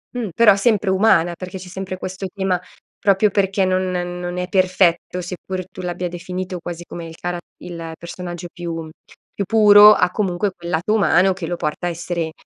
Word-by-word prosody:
Mh, 235 -4 -2
però 210 -2 +6
sempre 205 -1 +1
umana, 190 -3 +3
perché 185 +1 -7
c'è 185 - -10
sempre 185 0 -6
questo 185 +1 -5
tema: 190 -3 0 0.4
proprio 200 +1 +3
perché 195 0 +1
non 185 0 0
non 175 0 -4
è 180 0 -2
perfetto, 180 -1 +1
seppur 185 +1 -5
tu 185 - -9
l'abbia 180 0 -3
definito 180 +1 -5
quasi 175 0 -7
come 170 -1 -8
il 160 - -10
cara 175 0 -3 0.3
il 165 -2 -7
personaggio 175 0 -7
più, 175 -2 -5
mhmm 165 -1 -6 0.5
più 200 - -1
puro, 210 -1 +8
ha 180 -3 +2
comunque 195 0 -1
quel 175 0 -7
lato 175 +6 0
umano 195 -2 +4
che 180 -2 -6
lo 175 +1 -3
porta 155 +2 -3
a - - +1
essere, 170 -1 -3
180 Hz, 190 wpm, -20 LUFS, 175-190 Hz, 0.5 s, puro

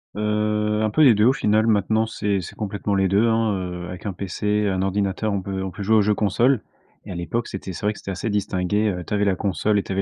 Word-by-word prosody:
Heu, 105 0 0
un 110 - +2
peu 155 +8 +3
des 120 -6 +7
2 105 - +3
au 130 - +5
final. 110 -4 +2
Maintenant, 110 +1 +2
c'est 105 -3 -1
c'est 85 - -9
complètement 100 -1 -2
les 95 -1 +2
2, 100 +4 +3
hein, 115 -2 +2
heu. 90 -1 -5
Avec 90 +3 -8
un 100 - -2
PC, 105 +3 -1
un 95 -1 0
ordinateur, 100 +2 -1
on 100 - -1
peut 95 0 -4
on 95 - -4
peut 100 - -9
jouer 110 +3 +3
aux 105 - +5
jeux 105 +1 +2
console. 115 +5 +2 0.4
Et - - -8
à 90 - -5
l'époque, 100 +8 -3
c'était 95 -1 -6
c'est 100 - -6
vrai 105 - +2
que - - -12
c'était 100 - -6
assez 95 +4 -3
distingué. 105 +1 0
Heu, 90 -3 -3
tu - - -6
avais 105 0 +2
la 95 -2 +2
console 100 +2 0
et - - -2
tu - - -8
avais 95 +1 0
105 Hz, 275 wpm, -23 LUFS, 95-105 Hz, 0.4 s, des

